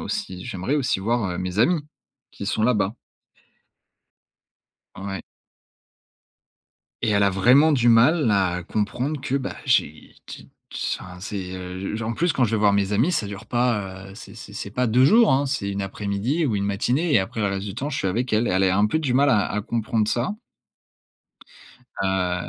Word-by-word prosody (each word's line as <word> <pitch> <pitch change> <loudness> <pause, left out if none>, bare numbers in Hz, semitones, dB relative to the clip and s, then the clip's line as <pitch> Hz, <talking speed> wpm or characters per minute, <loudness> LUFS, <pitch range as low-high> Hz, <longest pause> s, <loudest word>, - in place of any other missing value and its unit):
aussi 205 - -5
j'aimerais 95 +9 -3
aussi 135 -8 0
voir, 115 +3 0
heu, 90 - -4
mes 90 +1 -4
amis 165 +9 +3 0.5
qui 100 - -8
sont 110 - -1
là-bas. 105 -3 +1 2.0
Ouais. 95 0 -5 1.8
Et 115 - +1
elle 100 -1 +3
a 100 - +4
vraiment 125 +11 +5
du 120 -4 +3
mal 120 +4 +5
à 95 -3 +1
comprendre 120 - -2
que 130 - -3
bah, 135 -1 -4
j'ai 80 - 0
qui - - -11 0.5
enfin 90 0 -10
c'est, 95 -1 -5
heu, 95 +3 -5
j 115 - -5
en 115 - -2
plus 170 +7 0
quand 130 - +2
je 110 - -1
vais 110 - +2
voir 105 -1 +4
mes 100 0 +1
amis, 120 - +2
ça 110 - 0
dure 100 -1 -8
pas, 105 -6 -1
heu, - - -11
c'est 110 - -12
c'est 115 -2 -11
c'est 100 -1 -6
pas 125 +3 0
2 120 +3 +4
jours, 220 - +5
hein, 140 +2 +2
c'est 100 -7 -2
1 100 0 -3
après-midi 100 - -2
ou 115 - 0
1 100 - -1
matinée 125 - 0
et - - +6
après 95 +4 -3
le 105 - +1
reste 100 0 -3
du 100 - -6
temps, 140 - -3
je 140 - -3
suis - - -1
avec 120 +6 -2
elle. 115 +2 +2
Et - - 0
elle 95 +1 +2
est 95 - +3
un 100 +3 +3
peu 160 +9 0
du 135 -6 -1
mal 140 +2 +4
à 105 -5 +3
à 105 0 -2
comprendre 110 -1 -1
ça. 180 - -1 1.6
Heu, 90 -2 -1
105 Hz, 200 wpm, -23 LUFS, 95-130 Hz, 2.0 s, et